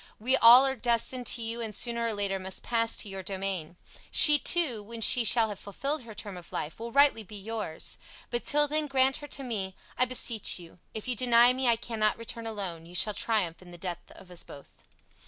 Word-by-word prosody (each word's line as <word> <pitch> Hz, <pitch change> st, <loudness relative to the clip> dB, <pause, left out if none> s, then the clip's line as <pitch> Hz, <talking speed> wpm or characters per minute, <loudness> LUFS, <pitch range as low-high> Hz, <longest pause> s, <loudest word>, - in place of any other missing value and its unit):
We 250 Hz, +5 st, +1 dB
all 245 Hz, +2 st, +8 dB
are 265 Hz, 0 st, -1 dB
destined 240 Hz, +1 st, +1 dB
to 235 Hz, -, -1 dB
you 230 Hz, +1 st, -5 dB
and 220 Hz, -3 st, -6 dB
sooner 235 Hz, 0 st, -2 dB
or 225 Hz, -, -2 dB
later 200 Hz, -1 st, -2 dB
must 190 Hz, 0 st, -3 dB
pass 230 Hz, -1 st, 0 dB
to -, -, -3 dB
your 195 Hz, -1 st, -7 dB
domain. 190 Hz, -3 st, -5 dB, 0.3 s
She 295 Hz, -1 st, +8 dB
too, 290 Hz, -12 st, +1 dB
when 230 Hz, +3 st, -10 dB
she 240 Hz, +2 st, +4 dB
shall 225 Hz, 0 st, +5 dB
have 205 Hz, -, -7 dB
filled 275 Hz, +9 st, -3 dB
her 230 Hz, -3 st, -12 dB
term 205 Hz, -3 st, -8 dB
of 175 Hz, -, -13 dB
life, 150 Hz, -, -5 dB
will 235 Hz, +1 st, -7 dB
rightly 280 Hz, -3 st, +4 dB
be 210 Hz, 0 st, -12 dB
yours. 210 Hz, -5 st, -5 dB, 0.3 s
But 240 Hz, 0 st, -2 dB
till 295 Hz, 0 st, +2 dB
then 305 Hz, +1 st, 0 dB
grant 265 Hz, -1 st, +2 dB
her 290 Hz, -, -9 dB
to 275 Hz, -, -6 dB
me, 195 Hz, -6 st, -4 dB, 0.2 s
I 255 Hz, -, +4 dB
beseech 240 Hz, -3 st, +1 dB
you. 170 Hz, -2 st, -14 dB, 0.2 s
If 220 Hz, -, -6 dB
you 250 Hz, -, 0 dB
deny 240 Hz, +1 st, +5 dB
me 260 Hz, 0 st, -2 dB
I 235 Hz, -, +4 dB
cannot 220 Hz, -2 st, -1 dB
return 230 Hz, 0 st, -6 dB
alone; 185 Hz, -7 st, -6 dB
you 175 Hz, -, -13 dB
shall 210 Hz, +4 st, +3 dB
triumph 195 Hz, -7 st, -2 dB
in 180 Hz, -, -15 dB
the 175 Hz, -, -12 dB
death 175 Hz, -1 st, -6 dB
of 180 Hz, -, -16 dB
us 175 Hz, -, -4 dB
both." 140 Hz, -, -15 dB
225 Hz, 225 wpm, -27 LUFS, 195-245 Hz, 0.3 s, all